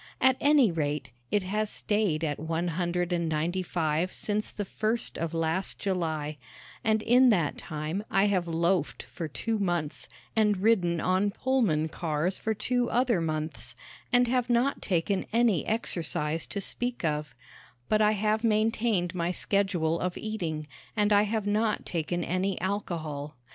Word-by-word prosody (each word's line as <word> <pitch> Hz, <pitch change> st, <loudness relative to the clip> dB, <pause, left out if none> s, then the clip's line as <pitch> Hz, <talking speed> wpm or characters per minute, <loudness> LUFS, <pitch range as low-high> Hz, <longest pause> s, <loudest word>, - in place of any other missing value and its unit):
At 260 Hz, -1 st, +5 dB
any 285 Hz, -7 st, +5 dB
rate, 150 Hz, -4 st, -2 dB, 0.2 s
it 205 Hz, -2 st, +1 dB
has 210 Hz, +3 st, -1 dB
stayed 205 Hz, -9 st, 0 dB
at 150 Hz, -2 st, -1 dB
a 165 Hz, +2 st, -1 dB
hundred 175 Hz, +1 st, -1 dB
and 170 Hz, -2 st, 0 dB
ninety 165 Hz, +4 st, 0 dB
five 165 Hz, 0 st, 0 dB
since 210 Hz, 0 st, -1 dB
the 205 Hz, -, -5 dB
first 220 Hz, +4 st, -2 dB
of 165 Hz, -1 st, -2 dB
last 165 Hz, +3 st, -1 dB
July, 160 Hz, -6 st, -2 dB, 0.4 s
and 220 Hz, -1 st, +2 dB
in 250 Hz, +2 st, +6 dB
that 175 Hz, -10 st, +1 dB
time 155 Hz, +5 st, -4 dB
I 195 Hz, -, +3 dB
have 185 Hz, -4 st, +1 dB
loafed 170 Hz, 0 st, 0 dB
for 165 Hz, -, -6 dB
two 220 Hz, +9 st, -2 dB
months 175 Hz, -6 st, -2 dB, 0.3 s
and 210 Hz, -2 st, +3 dB
ridden 185 Hz, -5 st, +2 dB
on 185 Hz, +4 st, +2 dB
Pullman 205 Hz, -10 st, +1 dB
cars 165 Hz, +3 st, -1 dB
for 220 Hz, 0 st, -1 dB
two 245 Hz, +3 st, 0 dB
other 240 Hz, -6 st, +2 dB
months, 155 Hz, -7 st, -3 dB, 0.4 s
and 245 Hz, 0 st, +5 dB
have 250 Hz, 0 st, +1 dB
not 245 Hz, +3 st, +2 dB
taken 185 Hz, +1 st, 0 dB
any 225 Hz, -7 st, +2 dB
exercise 165 Hz, -7 st, -1 dB
to 200 Hz, -, -3 dB
speak 245 Hz, +1 st, -1 dB
of; 150 Hz, -4 st, -2 dB, 0.5 s
but 215 Hz, 0 st, +3 dB
I 210 Hz, 0 st, +4 dB
have 215 Hz, +2 st, 0 dB
maintained 215 Hz, -4 st, +1 dB
my 175 Hz, -1 st, -1 dB
schedule 180 Hz, -4 st, +1 dB
of 180 Hz, -1 st, -2 dB
eating 170 Hz, -9 st, -3 dB, 0.3 s
and 210 Hz, 0 st, +3 dB
I 205 Hz, +1 st, +5 dB
have 220 Hz, -2 st, -1 dB
not 210 Hz, +1 st, +1 dB
taken 175 Hz, +1 st, -2 dB
any 185 Hz, +3 st, -1 dB
alcohol. 160 Hz, -7 st, -3 dB
185 Hz, 155 wpm, -28 LUFS, 160-215 Hz, 0.5 s, in